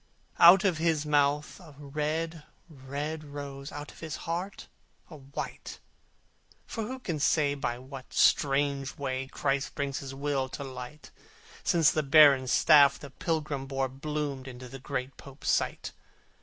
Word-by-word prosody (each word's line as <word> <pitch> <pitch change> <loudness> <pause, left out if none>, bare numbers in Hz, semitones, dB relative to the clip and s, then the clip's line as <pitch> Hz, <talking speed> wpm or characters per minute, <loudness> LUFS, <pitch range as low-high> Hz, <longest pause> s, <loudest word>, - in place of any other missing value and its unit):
Out 180 +3 +9
of 180 -6 +1
his 160 -2 +1
mouth 145 +1 +1
a 160 -6 -14
red, 155 +3 -3 0.3
red 145 +1 -5
rose! 140 -1 -8
Out 145 0 -7
of - - -17
his 160 -2 -5
heart 175 +4 -4 0.5
a 155 - -9
white! 140 0 -7 0.9
For 225 -2 -4
who 260 +4 -5
can 170 -12 -4
say 145 0 +2
by 130 -4 -3
what 130 +1 -11
strange 140 -1 +2
way, 135 -1 -3
Christ 140 +1 -2
brings 140 -1 -2
His 135 -1 -7
will 140 -1 -1
to 140 - -6
light, 130 +2 -9 0.5
Since 165 -3 +4
the 155 - 0
barren 140 -2 +6
staff 140 +1 +6
the 140 - -11
pilgrim 150 -4 -3
bore 135 -1 -1
Bloomed 140 0 -4
in 125 -1 -8
the 125 +1 -9
great 135 0 -4
Pope's 135 0 -4
sight? - - -1
145 Hz, 150 wpm, -29 LUFS, 135-155 Hz, 0.9 s, Out